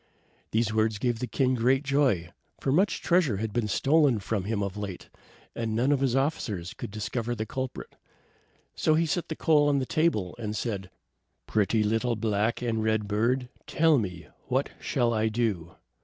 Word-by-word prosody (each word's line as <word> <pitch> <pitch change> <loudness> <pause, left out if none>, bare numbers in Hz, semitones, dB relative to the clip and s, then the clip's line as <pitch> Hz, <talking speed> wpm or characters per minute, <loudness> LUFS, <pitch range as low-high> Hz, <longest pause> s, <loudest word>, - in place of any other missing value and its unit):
These 110 -1 0
words 110 -1 +1
gave 120 +1 -1
the 125 - -3
king 130 0 +1
great 130 +3 +2
joy, 135 - +1 0.3
for 135 - 0
much 185 +8 +2
treasure 170 - +3
had 110 +1 -3
been 115 -2 0
stolen 140 +3 +3
from 100 -1 -2
him 105 -1 -1
of 100 -1 -4
late, 100 -4 -6 0.5
and 115 -2 -2
none 125 +5 +2
of 145 - +3
his 130 -2 +1
officers 110 - -1
could - - -7
discover 115 +3 -3
the 110 -1 -3
culprit. 130 +3 -5 0.8
So 155 - +2
he 165 +1 +2
set 175 +2 -1
the 160 - -4
coal 150 -3 +3
on 140 - +2
the 135 - 0
table, 130 - 0
and 105 -2 -3
said: 100 -4 -3 0.6
"Pretty 110 +1 +1
little 115 +3 +1
black 110 +2 0
and 115 -2 0
red 110 -1 +1
bird, 120 +5 0 0.2
tell 160 -3 +4
me, 90 -6 -5 0.2
what - - 0
shall 120 -1 0
I 110 0 +1
do?" 105 -7 -1
115 Hz, 180 wpm, -27 LUFS, 105-135 Hz, 0.8 s, tell